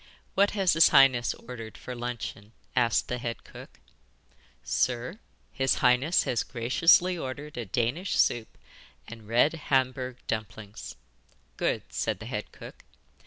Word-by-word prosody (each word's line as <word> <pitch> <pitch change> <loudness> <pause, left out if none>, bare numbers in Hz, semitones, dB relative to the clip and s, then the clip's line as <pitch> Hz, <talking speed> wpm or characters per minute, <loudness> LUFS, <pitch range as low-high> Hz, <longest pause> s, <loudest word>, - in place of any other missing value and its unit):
'What 200 +1 +4
has 190 -3 +3
his 165 +1 +7
highness 130 -3 +5
ordered 115 -2 -9
for 125 - -7
luncheon?' 120 -3 -6 0.2
asked 120 -2 +2
the 125 - -3
head 115 -1 -5
cook. - - -13 0.8
'Sir, 125 - -1 0.3
his 135 -1 +1
highness 125 +7 +3
has 120 - 0
graciously 165 +9 +3
ordered 145 -1 -6
a 120 -3 -5
Danish 125 - -1
soup 115 -2 +1 0.5
and 115 -2 -11
red 120 +7 +3 0.2
Hamburg 130 -1 0
dumplings.' 110 -1 -6 0.6
'Good,' - - -2
said - - -1
the - - -10
head - - -5
cook. - - -12
125 Hz, 130 wpm, -28 LUFS, 115-140 Hz, 0.8 s, his